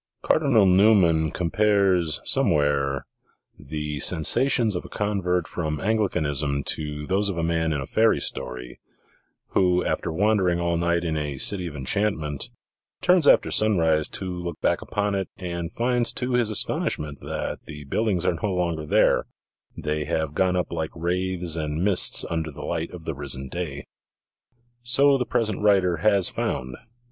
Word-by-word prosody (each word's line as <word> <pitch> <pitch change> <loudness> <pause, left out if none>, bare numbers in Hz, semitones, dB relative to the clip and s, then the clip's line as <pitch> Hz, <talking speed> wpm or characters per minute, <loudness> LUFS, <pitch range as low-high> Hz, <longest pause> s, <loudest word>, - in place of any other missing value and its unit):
Cardinal 135 -10 +3
Newman 90 -5 +4
compares, 90 -2 +1
somewhere, 70 -2 +2 0.6
the 75 -1 -4
sensations 110 - +3
of 90 - -4
a - - -12
convert 90 -4 -1
from 75 -3 -4
Anglicanism 75 -10 -1
to 75 -1 -3
those 100 +5 +1
of 95 - -4
a 85 - -1
man 80 -1 0
in 75 - -1
a 70 - -5
fairy 110 +8 +2
story, 60 0 -4 0.7
who, 90 -1 +1
after - - -2
wandering 95 -1 +1
all 85 0 -1
night 85 0 0
in 80 -2 -2
a 75 -3 -3
city 90 +5 +2
of 75 - -8
enchant 100 +10 0
ment, 75 -2 -3 0.5
turns 180 -4 +3
after - - +4
sunrise 80 -8 +3
to 95 - -3
look 85 -2 -6
back - - 0
upon 105 0 -2
it, 95 -1 -3
and 85 -2 -5
finds 120 +1 0
to 125 0 -3
his 120 -3 +1
astonishment 75 -7 +1
that - - -5
the 75 -1 -9
buildings 90 +4 -1
are - - +2
no 105 - -1
longer 85 -4 -2
there; - - +2 0.5
they 75 0 -3
have 80 0 -2
gone 90 +3 +1
up 90 - -2
like 80 -2 -3
wraiths 90 0 -1
and 80 +1 -3
mists 95 -2 +3
under 80 -1 -3
the 70 - -8
light 85 -1 -3
of 85 -2 -11
the 80 - -3
risen 70 -1 -4
day. 75 -4 -5 1.0
So 135 +4 +5
the 125 - -2
pres 115 -2 0
ent 100 - -6
writer 95 -4 +2
has 100 +1 +2
found. 65 0 -4
85 Hz, 160 wpm, -24 LUFS, 75-100 Hz, 1.0 s, So